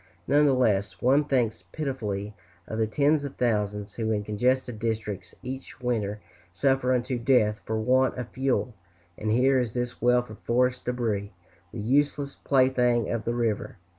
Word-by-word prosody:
Nevertheless, 125 - +3
one 140 +4 +3
thinks 125 -6 0
pitifully 105 -9 -4 0.3
of 110 - -5
the 110 - +2
tens 145 +6 +2
of 140 - -6
thousands 105 -3 -1
who, 110 -2 -2
in 105 -1 0
congested 125 +3 0
districts, 110 -3 -3
each 130 +1 -7
winter 110 -5 -1 0.3
suffer 135 +5 +1
unto 125 0 0
death 115 -4 +3
for 110 - -1
want 130 +4 +2
of 125 -3 -5
fuel; 130 -1 -1 0.4
and 110 - -3
here 130 +3 +4
is 120 -3 -2
this 125 0 -3
wealth 125 -1 +2
of 110 - -11
forest 125 +1 +1
debris, 110 -5 -2 0.4
the 115 - -7
useless 140 +4 +1
plaything 125 -4 +2
of 115 -2 -2
the 120 - -1
river. 115 -4 -1
120 Hz, 155 wpm, -27 LUFS, 110-130 Hz, 0.4 s, here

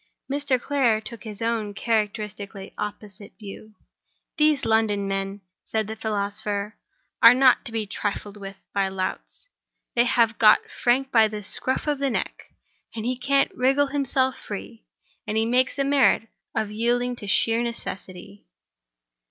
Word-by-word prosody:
Mr. 275 -2 0
Clare 245 -5 +2
took 225 +1 -9
his 215 -1 -5
own 220 -3 -1
characteristically 210 -2 -2
opposite 210 -1 -7
view. 215 0 -11 0.6
"These 300 -2 +3
London 215 -3 +2
men," 195 +1 -3 0.3
said 220 -1 -1
the 220 +2 -6
philosopher, 205 -1 -3 0.5
"are - - +9
not 255 -1 +5
to - - -3
be 225 -1 -2
trifled 205 0 -4
with 195 -1 -8 0.2
by 195 -1 +1
louts. 190 - -5 0.5
They 240 0 +3
have 235 -1 +2
got 215 -2 +6
Frank 265 +3 +1
by 225 -2 +6
the 210 -1 -6
scruff 255 +6 -1
of 295 -2 -1
the 275 -1 +1
neck—he 235 -1 -5
can't 275 +2 +2
wriggle 275 +3 +2
himself 265 -2 +1
free—and 215 +1 -8
he 220 - +2
makes 250 +4 +1
a 275 - +1
merit 275 -5 +3 0.3
of 210 -1 -1
yielding 240 +3 0
to 205 - -8
sheer 225 +3 +2
necessity." 200 -4 -6
220 Hz, 140 wpm, -24 LUFS, 205-250 Hz, 0.6 s, are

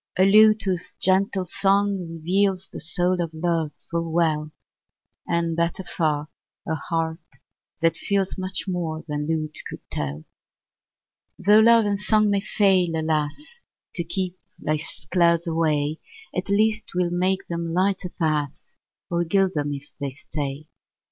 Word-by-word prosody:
A 185 - +5
lute 215 +2 +6
whose 185 -3 -2
gentle 190 0 +2
song 200 +2 +1
reveals 185 +3 0
The - - -6
soul 180 +2 0
of 170 - -2
love 165 -2 0 0.2
full 165 -1 -2
well; 155 -2 +1 0.8
And, 170 -1 0
better 170 +3 -1
far, 155 -4 -1 0.4
a 160 - 0
heart 160 +1 -2 0.6
that 165 -1 +3
feels 195 +1 0
Much 185 0 -4
more 165 -4 -3
than 150 -1 -3
lute 155 -1 -1
could - - -8
tell. 75 +1 -3 1.1
Tho' 205 +3 +5
love 230 0 +6
and 200 -1 0
song 215 0 +3
may 200 -1 +2
fail, 190 -5 +2
alas! 160 - -2 0.3
To 170 - 0
keep 180 +1 -3 0.2
life's 155 -2 -3
clouds 170 -1 +3
away, 155 -2 0 0.4
At 185 +2 -2
least 215 +2 +2
'twill 180 -4 -1
make 185 +2 +1
them 170 -1 -3
lighter 185 +1 +1
pass, 155 -5 -2 0.3
Or 170 0 +1
gild 190 +2 +2
them 145 -1 -1
if 145 0 -7
they 140 -1 -2
stay. 140 +1 -5
170 Hz, 140 wpm, -24 LUFS, 160-195 Hz, 1.1 s, lute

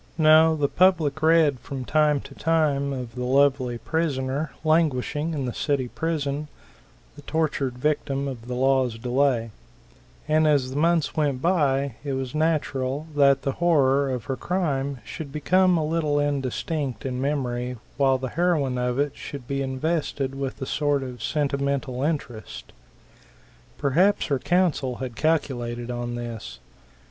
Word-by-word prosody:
No, 160 0 +6
the 145 -2 +1
public 160 -4 +2
read 160 -4 +4
from 130 +1 -6
time 150 -1 +2
to 140 - -12
time 150 -3 +1
of 125 -4 -5
the 125 0 -4
lovely 130 -1 +2
prisoner, 145 -1 -1
languishing 155 0 +1
in 140 -3 -2
the 125 - -3
city 140 -4 -1
prison, 150 -2 -2 0.7
the 145 - -12
tortured 140 -4 -1
victim 140 0 -1
of 120 -3 -7
the 125 - -3
law's 130 -2 +2
delay; 125 -1 +1 0.8
and 155 0 +3
as 140 -4 +2
the - - -6
months 165 +1 +2
went 145 -5 0
by 140 -7 +1
it 140 -2 -3
was 130 -1 -3
natural 150 -3 0
that 140 -1 +4
the 135 - 0
horror 140 -4 +2
of 125 -3 -3
her 135 - -3
crime 140 -5 -1
should 150 -4 -7
become 180 +5 +3
a 155 - 0
little 155 -2 0
indistinct 145 0 -2
in 130 -1 -2
memory, 125 -3 -2 0.2
while 135 -2 +3
the 130 0 -4
heroine 150 -5 +1
of 125 0 -1
it 145 0 0
should 140 -4 -8
be 140 0 -2
invested 135 0 -2
with 135 -1 -4
a 130 - -3
sort 145 0 0
of 125 -2 -8
sentimental 140 -3 -1
interest. 120 - -4 1.0
Perhaps 175 +9 +2
her 140 -3 0
counsel 165 -8 +1
had 125 -2 -6
calculated 125 -6 -1
on 120 0 -4
this. 115 - -6
140 Hz, 150 wpm, -25 LUFS, 130-155 Hz, 1.0 s, No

